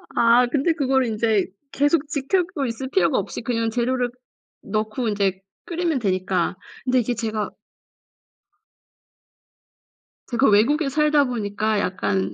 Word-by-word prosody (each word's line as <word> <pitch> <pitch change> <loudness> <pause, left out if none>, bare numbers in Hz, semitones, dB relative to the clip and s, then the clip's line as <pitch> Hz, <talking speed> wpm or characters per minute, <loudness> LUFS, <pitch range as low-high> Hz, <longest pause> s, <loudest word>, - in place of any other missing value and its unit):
아 235 +1 +5
아 - - +1
근데 290 +6 +1
그거를 265 -4 +1
인제 220 -2 +1 0.2
계속 290 +1 +2
지켜보고 310 +1 -1
있을 250 +3 -5
필요가 385 - +2
없이 - - -3
그냥 230 -1 -1
재료를 245 +2 0 0.5
넣고 215 +3 -2
인제 195 -2 0 0.2
끓이면 335 -5 -1
되니까 185 -3 0 0.3
근데 255 0 +3
이제 240 +1 0
제가 220 -2 -2 2.8
제가 240 0 +3
외국에 275 +9 +3
살다 300 0 +3
보니까 215 -3 -1
약간 105 - -1
240 Hz, 270 characters per minute, -23 LUFS, 215-275 Hz, 2.8 s, 아